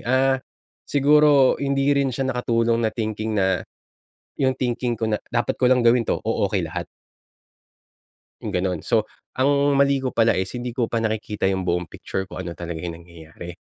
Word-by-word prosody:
ah, 130 Hz, +2 st, +3 dB, 0.5 s
siguro 145 Hz, -1 st, +4 dB
hindi 140 Hz, 0 st, 0 dB
rin 135 Hz, -2 st, +1 dB
siya 130 Hz, +2 st, -2 dB
nakatulong 115 Hz, -2 st, +1 dB
na 110 Hz, -, +2 dB
thinking 110 Hz, -1 st, -3 dB
na 95 Hz, -2 st, +1 dB, 0.8 s
yung 130 Hz, -1 st, +2 dB
thinking 120 Hz, -1 st, -1 dB
ko 115 Hz, 0 st, -2 dB
na, 105 Hz, -, 0 dB
"Dapat 120 Hz, 0 st, 0 dB
ko 125 Hz, -, +4 dB
lang 125 Hz, -1 st, +3 dB
gawin 115 Hz, -1 st, +4 dB
'to, -, -, +1 dB
o-okey -, -, 0 dB
lahat." -, -, -5 dB, 1.6 s
Yung -, -, -4 dB
gano'n. 90 Hz, -2 st, -1 dB
So, -, -, +1 dB, 0.3 s
ang 130 Hz, +2 st, +3 dB, 0.3 s
mali 140 Hz, 0 st, +4 dB
ko 130 Hz, -1 st, -3 dB
pala 115 Hz, 0 st, +3 dB
is 95 Hz, 0 st, -2 dB
hindi 120 Hz, 0 st, -4 dB
ko 125 Hz, -, +1 dB
pa 115 Hz, -, +1 dB
nakikita 110 Hz, -3 st, -1 dB
yung 95 Hz, -1 st, -1 dB
buong 90 Hz, -1 st, -1 dB
picture 95 Hz, +4 st, -5 dB
kung -, -, -7 dB
ano 85 Hz, -, -5 dB
talaga 85 Hz, -1 st, -6 dB
yung 85 Hz, -1 st, -5 dB
nangyayari. 85 Hz, 0 st, -11 dB
115 Hz, 175 wpm, -23 LUFS, 95-130 Hz, 1.6 s, siguro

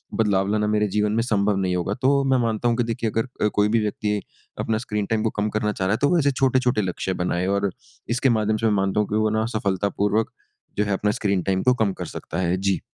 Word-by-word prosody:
बदलाव 100 Hz, -3 st, +2 dB
लाना 105 Hz, 0 st, +1 dB
मेरे 105 Hz, 0 st, +2 dB
जीवन 105 Hz, +1 st, 0 dB
में 115 Hz, -, +2 dB
संभव 105 Hz, -3 st, +1 dB
नहीं 95 Hz, -2 st, 0 dB
होगा। 90 Hz, +3 st, -1 dB
तो 140 Hz, +1 st, +3 dB
मैं 130 Hz, -, +4 dB
मानता 115 Hz, +1 st, 0 dB
हूँ 115 Hz, -, 0 dB
कि 120 Hz, -, +2 dB
देखिए 115 Hz, -1 st, -2 dB
अगर 115 Hz, +3 st, -1 dB, 0.2 s
अ, -, -, +5 dB
कोई 105 Hz, 0 st, +3 dB
भी 115 Hz, +1 st, +3 dB
व्यक्ति 105 Hz, 0 st, -1 dB, 0.4 s
अपना 110 Hz, -, 0 dB
स्क्रीन 105 Hz, -3 st, -3 dB
टाइम 110 Hz, +1 st, -1 dB
को 110 Hz, -, +2 dB
कम 105 Hz, -, 0 dB
करना 105 Hz, 0 st, -1 dB
चाह 95 Hz, -2 st, -2 dB
रहा 95 Hz, -, +2 dB
है -, -, +1 dB
तो 145 Hz, -, +4 dB
वो 175 Hz, -, +3 dB
ऐसे 140 Hz, -2 st, +3 dB
छोटे-छोटे 130 Hz, -3 st, +2 dB
लक्ष्य 95 Hz, 0 st, -2 dB
बनाएँ 90 Hz, +1 st, -1 dB
और 100 Hz, 0 st, +1 dB, 0.4 s
इसके 125 Hz, +3 st, +2 dB
माध्यम 110 Hz, -2 st, +1 dB
से 115 Hz, -, -2 dB
मैं 110 Hz, -, +3 dB
मानता 95 Hz, 0 st, +1 dB
हूँ 105 Hz, -, +1 dB
कि 105 Hz, -, -1 dB
वो 110 Hz, 0 st, +2 dB
ना 110 Hz, +1 st, 0 dB
सफलतापूर्वक 100 Hz, +2 st, 0 dB, 0.5 s
जो 105 Hz, -, +3 dB
है 100 Hz, -, 0 dB
अपना 105 Hz, +2 st, +1 dB
स्क्रीन 100 Hz, -3 st, +1 dB
टाइम 95 Hz, -1 st, 0 dB
को 125 Hz, -, +4 dB
कम 100 Hz, -3 st, 0 dB
कर -, -, -6 dB
सकता 85 Hz, -, -6 dB
है। 90 Hz, 0 st, +1 dB
जी। 95 Hz, 0 st, 0 dB
105 Hz, 260 wpm, -23 LUFS, 100-115 Hz, 0.5 s, अ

